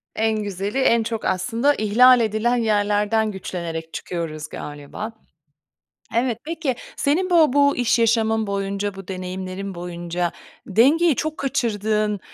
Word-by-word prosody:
En 220 -1 0
güzeli, 200 +4 -3
en 235 -3 +3
çok, 225 -1 -4
aslında, 230 +9 +1
ihlal 245 +4 +5
edilen 225 +2 +1
yerlerden 210 -1 +1
güçlenerek 170 -4 -5
çıkıyoruz 155 -3 -5
galiba. 145 +10 -7 1.0
Evet. 235 -1 +1
Peki 315 -5 -2 0.2
senin 350 +7 +1
bu 325 -6 +5
bu 285 0 +4
iş 245 -1 +2
yaşamın 225 -1 +2
boyunca, 200 0 -2
bu 195 -1 -10
deneyimlerin 185 +1 -5
boyunca 175 0 -3 0.3
dengeyi 280 - +4
çok 310 0 -3
kaçırdığın 215 -5 0
215 Hz, 120 wpm, -22 LUFS, 190-240 Hz, 1.0 s, ihlal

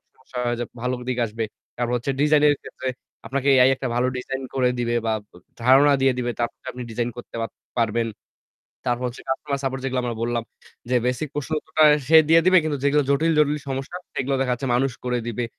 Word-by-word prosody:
সমস্যা 130 -1 -12
হয় 120 0 +1
যে 120 - -1 0.2
ভালো 125 +1 -1 0.2
দিকে 125 -1 -1
আসবে। 110 +1 -4 0.3
তারপর 120 0 -1
হচ্ছে 120 +3 -2
ডিজাইন 150 0 +4
এর 145 - +4
ক্ষেত্রে 130 - -7 0.4
আপনাকে 135 +3 -2
AI 130 0 +6
একটা 130 0 -4
ভালো 125 +1 +2
ডিজাইন 135 +1 -4
করে 130 -2 +3
দিবে 120 0 0
বা 110 - +1 0.2
ব - - -63 0.3
ধারণা 135 +3 +6
দিয়ে 135 -1 +4
দিবে। 120 -1 -1
তারপর 120 -1 -2
আপনি 125 - -8
ডিজাইন 120 +2 -1
করতে 120 - -10
পাত 115 - -3 0.3
পারবেন। 115 0 +1 0.8
তারপর 120 0 0
হচ্ছে 120 - -8
কাস্টমার 140 +1 -2
সাপোর্ট 135 -1 -2
যেগুলো 130 -1 -1
আমরা 120 -2 -2
বললাম 120 0 -1 0.5
যে 125 - +2
বেসিক 125 +4 -1
প্রশ্ন 145 +1 -4
উত্তরটা 155 0 +1 0.2
সে 160 +2 +7
দিয়ে 165 +1 +7
দিবে 185 0 +6
কিন্তু 150 -2 -1
যেগুলো 145 +1 +3
জটিল-জটিল 150 0 +3
সমস্যা 135 +5 -4 0.2
সেগুলো 135 +1 0
দেখা 130 -1 +1
যাচ্ছে 125 +2 -4
মানুষ 135 +2 +1
করে 125 0 0
দিবে। 120 +1 -2
130 Hz, 205 wpm, -23 LUFS, 120-140 Hz, 0.8 s, সে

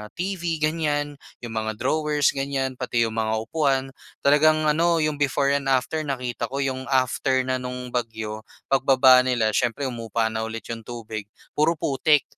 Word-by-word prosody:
TV 185 0 -3 0.2
ganyan, 145 -2 -1 0.2
'yong 120 - -6
mga 110 -1 -2
drawers 150 +4 +1
ganyan, 135 -2 -2
pati 120 -2 +1
'yong 115 - -1
mga 110 0 -1
upuan. 135 0 0 0.3
Talagang 155 +2 +4
ano, 165 +2 +2
'yong 155 -1 -1
before 140 -1 +2
and 140 -1 0
after 135 +4 +1
nakita 125 -3 -3
ko, 140 +1 -2
'yong 130 -1 -3
after 130 0 +1
na 130 0 -1
no'ng 125 0 -6
bagyo, 110 -3 -3 0.3
pagbaba 130 -1 +6
nila 125 -4 +1
syempre 120 +5 0
humupa 115 -3 -2
na 110 0 -2
ulit 115 0 -6
'yong 115 -1 -7
tubig, 110 -3 -6 0.2
puro 155 +3 +2
putik. 145 0 +2
130 Hz, 160 wpm, -24 LUFS, 115-145 Hz, 0.3 s, pagbaba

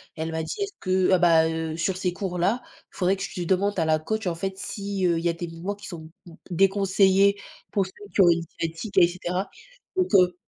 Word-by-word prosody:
elle 160 0 -3
m'a 160 0 -2
dit: 160 - -4
«Est-ce 400 0 -2
que, 185 - -7 0.2
heu - - +4
ah 185 - +5
bah, 165 -2 +5
heu, 160 -1 -3
sur 180 +2 0
ces 185 -1 -1
cours-là, 185 +5 -1 0.3
il - - -15
faudrait 185 0 +2
que 195 - -9
tu 180 -3 -4
demandes 195 +3 +1
à 165 - +2
la 155 0 +2
coach, 220 +7 -3
en 175 - 0
fait, 190 +2 -4
si 200 -1 -3
heu, 170 -1 +2
il - - -7
y - - +4
a - - 0
des 170 +1 -5
mouvements 170 +5 -5
qui 200 -1 -12
sont 160 -2 -8 0.4
déconseillés 195 +1 +3 0.3
pour 195 -2 +1
structurer 190 -2 +2
une 170 - -3 0.2
sciatique 165 +6 -4
et 175 -2 +8
cetera». 180 +2 -3 0.5
Donc 370 -1 +3
heu 180 -2 +5
185 Hz, 230 wpm, -25 LUFS, 170-195 Hz, 0.5 s, et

